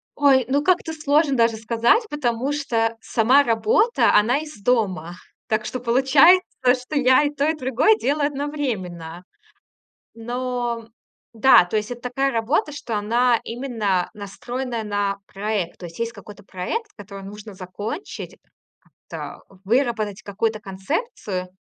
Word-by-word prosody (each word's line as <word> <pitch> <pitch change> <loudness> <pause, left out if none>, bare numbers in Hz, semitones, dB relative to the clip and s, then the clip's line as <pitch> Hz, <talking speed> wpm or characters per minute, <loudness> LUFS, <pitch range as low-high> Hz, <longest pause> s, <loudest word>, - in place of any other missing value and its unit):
Ой, 275 -3 +4
ну 285 +2 +1
как-то 355 -1 +1
сложно 300 -2 +2
даже 230 -1 +3
сказать, 230 - +2
потому 260 -1 -1
что 230 -6 -1
сама 230 +5 +4
работа, 430 - +2
она 225 +6 +4
из 305 -9 -10
дома. 190 -9 0 0.3
Так 215 0 0
что 255 - -4
получается, 270 +9 +5 0.3
что 250 +4 -6
я 260 +1 +5
и 290 - +1
то, 290 0 -1
и 320 - +1
другое 250 -5 +3
делаю 285 +6 0
одновременно. 215 - -4 0.9
Но 240 0 -3 0.4
да, 235 -3 +6
то 175 +5 -3
есть 210 +1 -2
это 240 -1 -7
такая 270 +2 0
работа, 250 +6 0
что 235 -6 -4
она 235 +3 +2
именно 225 -7 -1
настроенная 235 +3 -5
на 205 -1 -1
проект. 200 -3 -3
То 175 - -7
есть 165 - -12
есть 230 0 -2
какой-то 205 -1 -13
проект, 415 - -4
который 200 -1 -10
нужно 210 +1 -10
закончить, 205 - -7 0.7
как-то - - -7 0.2
выработать 220 -2 0
какую-то 215 +2 -2
концепцию. 195 - -4
235 Hz, 135 wpm, -22 LUFS, 210-275 Hz, 0.9 s, да